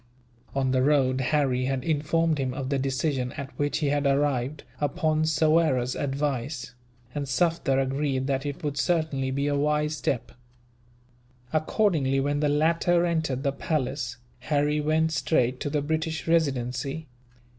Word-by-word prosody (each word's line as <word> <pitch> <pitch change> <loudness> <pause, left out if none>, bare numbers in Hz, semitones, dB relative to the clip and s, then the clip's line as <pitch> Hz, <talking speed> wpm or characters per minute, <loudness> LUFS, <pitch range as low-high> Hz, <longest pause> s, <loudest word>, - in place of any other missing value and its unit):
On 135 -1 +1
the 130 0 +2
road, 135 -2 +3
Harry 130 -2 +1
had 130 -1 -1
informed 160 +1 +1
him 130 -2 -1
of 135 -1 -4
the 140 -1 +1
decision 130 -1 -1
at 140 -2 -6
which 145 +1 +1
he 150 -2 0
had 145 0 +1
arrived, 140 0 0 0.2
upon 155 +1 +1
Soyera's 155 -5 +2
advice; 140 -2 -2 0.4
and 145 -1 -3
Sufder 160 -1 +1
agreed 135 0 0
that 135 -1 -1
it 145 0 -5
would 145 -1 -2
certainly 155 -4 0
be 140 +2 -1
a 145 0 +1
wise 150 +1 +1
step. 130 -4 -2 1.2
Accordingly, 155 -4 +2
when 145 +1 0
the 150 0 +2
latter 165 +3 +2
entered 160 -6 -1
the 140 - +1
palace, 130 -4 -2 0.2
Harry 150 0 +1
went 160 +2 +2
straight 130 -6 +1
to 145 - -2
the 145 -1 -1
British 160 +1 -2
Residency. 135 -2 0
145 Hz, 145 wpm, -26 LUFS, 135-155 Hz, 1.2 s, road